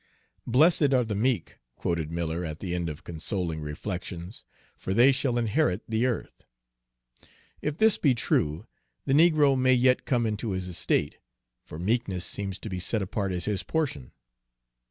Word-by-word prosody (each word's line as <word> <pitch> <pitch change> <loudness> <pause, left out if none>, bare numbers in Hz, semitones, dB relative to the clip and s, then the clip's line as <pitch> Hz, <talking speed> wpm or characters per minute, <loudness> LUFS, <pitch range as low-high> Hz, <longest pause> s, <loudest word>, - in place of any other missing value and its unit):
"'Blessed 145 +2 +4
are 125 - +3
the 110 -2 -3
meek,'" 120 +4 -1 0.2
quoted 85 -3 -2
Miller 85 +1 -2
at 80 -2 -5
the 90 -3 -4
end 85 -2 -2
of 75 - -4
these 75 - -19
consoling 85 -1 -3
reflections, 85 +4 -6 0.3
"'for 95 - -4
they 125 +4 +7
shall 130 -2 0
inherit 115 - +1
the 115 +3 +1
earth.' 120 - -4 1.2
If 150 0 -2
this 220 -2 +4
be 135 -5 +3
true, 80 -5 0 0.4
the 135 - +1
negro 150 -3 +5
may 130 0 +4
yet 125 +1 +3
come 120 -3 +1
into 110 -1 -2
his 95 0 -3
estate, 90 - -1 0.4
for 75 - -10
meekness 95 -1 -1
seems 100 -2 -3
to - - -6
be 90 -2 -4
set 105 +3 -1
apart 95 0 -2
as 90 -1 -3
his 100 -3 -1
portion." 110 - -2
105 Hz, 165 wpm, -27 LUFS, 90-130 Hz, 1.2 s, they